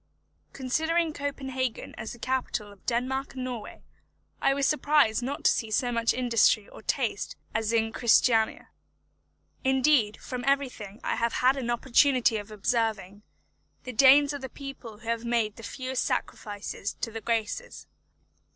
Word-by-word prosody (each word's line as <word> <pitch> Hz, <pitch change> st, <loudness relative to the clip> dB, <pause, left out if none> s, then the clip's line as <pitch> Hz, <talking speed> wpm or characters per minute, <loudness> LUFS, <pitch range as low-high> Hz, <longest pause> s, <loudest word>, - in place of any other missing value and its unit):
Considering 320 Hz, +5 st, 0 dB
Copenhagen 265 Hz, -4 st, -3 dB
as 220 Hz, -, -6 dB
the -, -, -11 dB
capital 245 Hz, -4 st, -2 dB
of 200 Hz, -2 st, -18 dB
Denmark 260 Hz, +3 st, -1 dB
and 255 Hz, -, -4 dB
Norway, 245 Hz, -4 st, -6 dB, 0.6 s
I -, -, +4 dB
was 275 Hz, 0 st, +1 dB
surprised 295 Hz, -7 st, +3 dB
not 275 Hz, +4 st, -4 dB
to -, -, +6 dB
see 225 Hz, -, -1 dB
so 245 Hz, +3 st, +1 dB
much 230 Hz, -1 st, +2 dB
industry 230 Hz, -4 st, +3 dB
or -, -, -13 dB
taste -, -, -2 dB, 0.2 s
as 220 Hz, 0 st, 0 dB
in 225 Hz, -1 st, +1 dB
Christiania. 225 Hz, -1 st, +3 dB, 0.9 s
Indeed, 265 Hz, -5 st, +3 dB
from 250 Hz, -1 st, -6 dB
everything 250 Hz, -7 st, -1 dB
I -, -, -1 dB
have 235 Hz, 0 st, 0 dB
had 255 Hz, +2 st, +3 dB
an 255 Hz, -3 st, -3 dB
opportunity 245 Hz, -1 st, +3 dB
of 205 Hz, 0 st, -7 dB
observing, 215 Hz, -2 st, -1 dB, 0.6 s
the 255 Hz, -, -6 dB
Danes 275 Hz, +4 st, +6 dB
are 285 Hz, -, -4 dB
the 265 Hz, -1 st, -7 dB
people 270 Hz, -6 st, -9 dB
who 225 Hz, +2 st, -15 dB
have 230 Hz, 0 st, -1 dB
made 230 Hz, -3 st, 0 dB
the -, -, -9 dB
fewest 255 Hz, +3 st, -3 dB
sacrifices 205 Hz, -1 st, -4 dB
to 230 Hz, -, -4 dB
the 225 Hz, 0 st, -6 dB
graces. 230 Hz, -, -3 dB
245 Hz, 150 wpm, -27 LUFS, 225-265 Hz, 0.9 s, to